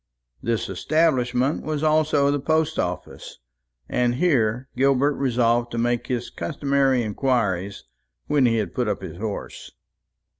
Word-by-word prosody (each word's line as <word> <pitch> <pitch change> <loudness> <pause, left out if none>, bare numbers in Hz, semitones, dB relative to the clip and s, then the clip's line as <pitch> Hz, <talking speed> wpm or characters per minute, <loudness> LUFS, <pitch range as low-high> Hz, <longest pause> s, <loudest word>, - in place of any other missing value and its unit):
This 115 -1 -1
establishment 130 - +1
was 155 -1 -3
also 155 -2 +3
the 145 - 0
post 160 +2 0
office, 90 0 -5 0.5
and 120 -1 +1
here 125 -6 +1
Gilbert 135 +2 +3
resolved 120 -3 +1
to - - -3
make 120 0 0
his 125 -1 -3
customary 135 +7 0
inquiries, 105 -4 -1 0.4
when 140 -4 +3
he 115 - +2
had 105 -6 -2
put 125 -2 -1
up 100 -2 -2
his 85 -3 -7
horse. 105 +1 -6
125 Hz, 135 wpm, -23 LUFS, 115-140 Hz, 0.5 s, also